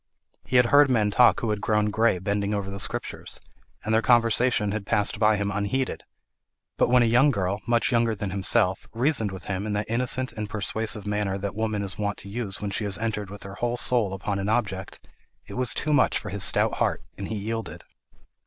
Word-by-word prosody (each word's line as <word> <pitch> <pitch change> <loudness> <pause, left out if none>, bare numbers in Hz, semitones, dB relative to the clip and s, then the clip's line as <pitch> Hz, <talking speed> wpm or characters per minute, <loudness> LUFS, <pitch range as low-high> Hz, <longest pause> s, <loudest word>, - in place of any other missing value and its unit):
He 130 - -4
had 125 -1 +6
heard 145 0 +7
men 110 -5 +2
talk 120 +4 +4
who 115 - -1
had 105 -1 -2
grown 105 -1 +1
grey 110 -2 +2
bending 100 +2 -1
over 100 -1 -3
the 100 - -6
Scriptures, - - -5 0.5
and 110 - 0
their 110 - +4
conversation 115 -2 +3
had 110 0 -3
passed 105 +1 0
by 110 0 +4
him 100 0 -1
unheeded; 105 +6 -2 0.7
but - - +2
when 125 0 +5
a - - +3
young 125 +6 +4
girl, 100 -5 -1
much 120 -1 +2
younger 115 -2 +2
than 100 -2 -4
himself, 95 -1 +1
reasoned 120 -3 +1
with 95 - -9
him 100 +1 -3
in 105 - -2
that 105 0 -1
innocent 125 +2 -1
and 105 -1 -5
persuasive 110 0 -2
manner 105 -2 -1
that 100 0 -4
woman 110 -1 -2
is 95 +1 -5
wont 100 -1 -2
to 100 - -9
use 100 -2 -3
when 105 -1 -4
she 100 - -2
has 100 -1 +1
entered 105 -2 -3
with 100 0 -10
her 95 0 -8
whole 120 +4 -2
soul 115 -6 +1
upon 100 +1 -3
an 100 +1 -2
object, 100 -5 -2 0.5
it - - -10
was 125 -3 0
too 150 - 0
much - - +3
for 105 - -6
his 100 -1 +1
stout - - +2
heart, - - 0 0.2
and 100 - -4
he 110 - -4
yielded. 110 +2 -5
105 Hz, 220 wpm, -25 LUFS, 100-115 Hz, 0.7 s, heard